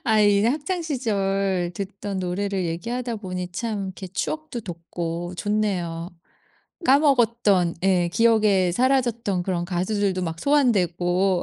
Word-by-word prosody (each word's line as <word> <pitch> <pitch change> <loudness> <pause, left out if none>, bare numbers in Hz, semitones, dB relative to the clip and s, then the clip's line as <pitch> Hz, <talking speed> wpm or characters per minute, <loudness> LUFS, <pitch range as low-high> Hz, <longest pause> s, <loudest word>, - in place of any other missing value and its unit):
아 220 -2 +2
이제 205 +1 +4
학창시절 215 - -1
듣던 200 0 -5
노래를 185 +1 -2
얘기하다 235 +8 -3
보니 180 -3 -5
참 210 0 -3
이렇게 190 0 -7
추억도 310 - -4
돋고 170 -1 -5
좋네요. 185 -5 -1 0.7
까먹었던 235 - +3
예 180 -2 +3
기억에 210 -5 +3
사라졌던 235 -5 +1
그런 175 -2 -1
가수들도 185 +1 -1
막 165 0 -5
소환되고. 185 - +2
195 Hz, 280 characters per minute, -24 LUFS, 180-230 Hz, 0.7 s, 이제